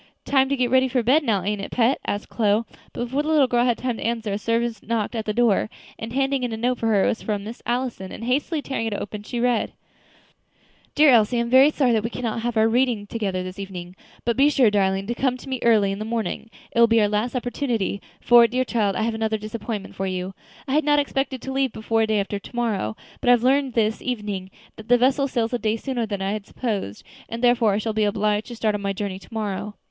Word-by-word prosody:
"Time 270 -1 +3
to 280 - +1
get 250 -2 0
ready 260 0 +4
for 250 -1 0
bed 270 +7 +4
now, 205 -8 +1
ain't 205 +1 -2
it, - - -6
pet?" 250 +3 +2
asked 205 +1 -2
Chloe; 215 0 +1 0.3
but - - -4
before 260 +4 -1
the 300 - -5
little 305 -3 +5
girl 240 -1 +2
had 240 -2 +2
time 245 -2 -2
to - - -6
answer, 225 -3 -2
a - - -1
servant 230 -1 -1
knocked 225 0 -2
at 220 -2 -3
the 215 - -1
door, 220 -2 +2 0.3
and 225 +1 -6
handed 270 +1 0
in 245 - -1
a 220 - -3
note 245 +2 0
for 225 - -1
her. 205 -3 +3
It - - +3
was 225 - -2
from 205 -2 -2
Miss 225 +3 -8
Allison, 240 -6 -2
and, - - -8
hastily 285 +5 -1
tearing 245 -4 -2
it 215 - -2
open, 210 +1 -5
she 235 +3 -5
read: 245 -1 +1 1.2
"DEAR 300 -1 +6
ELSIE 235 0 +4
I - - +2
am 235 0 -3
very 265 +3 +7
sorry 275 -5 +1
that 220 -2 +1
we 225 - -2
cannot 230 +1 -3
have 240 0 -2
our 220 0 +5
reading 235 -2 +1
together 200 -4 -3
this 185 +1 -8
evening; 185 -2 -7 0.3
but 235 0 +1
be 280 +2 +5
sure, 255 -7 +4
darling, 195 -1 +1
to 240 - -2
come 255 0 0
to 265 - -13
me 260 -1 -3
early 215 -4 +4
in 195 - -4
the - - -3
morning; 225 -1 -3 0.2
it - - -1
will 235 - +7
be 230 0 +4
our 210 - +4
last 210 +5 -1
opportunity, 240 -5 -2 0.2
for, 240 -1 +6
dear 255 +2 -1
child, 210 -6 0
I 220 - 0
have 230 0 0
another 220 0 -1
disappointment 215 -1 -6
for 195 - -3
you. 185 0 -3 0.3
I 265 - -2
had 305 +2 +3
not 295 0 +3
expected 270 -2 -1
to 265 - -4
leave 270 -2 0
before 225 0 0
day 215 -1 +1
after 200 0 -3
to 220 - -13
morrow, 210 - -1 0.2
but - - -5
I - - +9
have 240 -1 +2
learned 270 0 +2
this 220 -1 +1
evening 210 -6 -4 0.3
that 220 - -11
the 245 - +5
vessel 270 +3 +2
sails 235 -3 -1
a 245 - 0
day 215 0 0
sooner 240 -2 -3
than 200 -2 -3
I 195 - -1
had 210 -1 -5
supposed, 205 - -4 0.3
and 230 +2 -5
therefore 240 -4 +4
I - - +1
shall 220 +1 -2
be 215 0 +1
obliged 210 0 0
to 240 - -7
start 220 -2 0
on 205 - -3
my 200 0 -1
journey 195 -1 -4
to 195 - -18
morrow. 210 -1 -4
230 Hz, 260 wpm, -23 LUFS, 210-250 Hz, 1.2 s, I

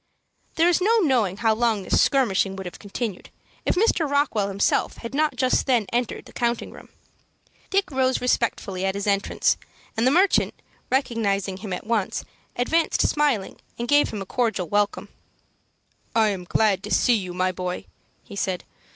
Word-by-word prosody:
There 330 +1 +4
is 350 +1 +3
no 450 +5 +4
knowing 235 - +2
how 225 0 +2
long 220 -3 +1
this - - +2
skirmishing 200 -8 +2
would 190 0 -7
have 180 - -8
continued, 205 -1 -5 0.4
if - - +2
Mr. 360 -6 +2
Rockwell 285 -8 +1
himself 200 0 0
had 230 +2 -8
not 305 +2 +1
just 255 0 +1
then 245 -5 +3
entered 240 -1 -1
the - - -15
counting 235 -1 -1
room. - - -13 0.8
Dick 390 -2 +1
rose 260 -1 +1
respectfully 215 -6 -1
at 190 0 0
his 200 - -3
entrance, 200 -1 +1 0.4
and 225 +3 +2
the - - +6
merchant, 365 +8 +3 0.3
recognizing 205 -7 0
him 200 0 -7
at 180 - -4
once, 220 -4 -1 0.3
advanced 320 +7 +2
smiling 285 -10 0 0.2
and 235 - -3
gave 290 +2 +4
him 205 -2 -4
a - - -13
cordial 215 -4 -1
welcome. 205 +2 0 1.1
"I 220 -1 +4
am 190 -3 -4
glad 200 0 +2
to 210 +1 -7
see 245 - +4
you, 190 -5 -1
my 185 0 +1
boy," 180 +1 -4 0.4
he 200 - -11
said. 190 -2 -2
225 Hz, 170 wpm, -24 LUFS, 195-260 Hz, 1.1 s, the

